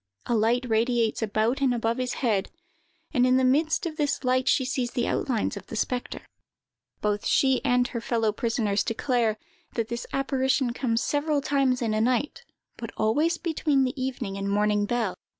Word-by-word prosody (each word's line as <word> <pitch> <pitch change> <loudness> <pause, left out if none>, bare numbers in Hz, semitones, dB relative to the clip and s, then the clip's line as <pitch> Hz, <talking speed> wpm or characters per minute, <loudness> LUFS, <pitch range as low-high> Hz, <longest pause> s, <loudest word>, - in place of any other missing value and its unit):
A - - -1
light 235 +3 +2
radiates 230 0 +1
about 220 +5 0
and 260 -3 +2
above 230 +1 -1
his 255 -1 -2
head, 205 -4 +1 0.6
and 250 -4 +3
in 255 0 +4
the 260 - +2
midst 305 +7 +2
of 315 -2 -4
this 290 -3 -1
light 255 +1 +1
she 260 - +3
sees 255 -1 -1
the 240 -1 -1
outlines 235 -7 -1
of 200 - -9
the - - -7
spectre. 245 +3 -3 0.8
"Both 210 -1 0
she 265 -2 +2
and 250 -2 +2
her 235 - -4
fellow 225 -2 0
prisoners 215 -3 0
declare, 230 -2 0 0.4
that 230 -1 -1
this 235 0 -4
apparition 265 -2 0
comes 230 -2 0
several 290 0 0
times 270 -3 +1
in 220 -2 0
a 215 - +1
night, 250 +4 0 0.3
but 230 - -6
always 300 +10 +2
between 305 -5 +1
the 255 - -1
evening 240 -7 -4
and 200 0 -2
morning 210 0 +1
bell. 230 -5 0
245 Hz, 180 wpm, -26 LUFS, 225-265 Hz, 0.8 s, in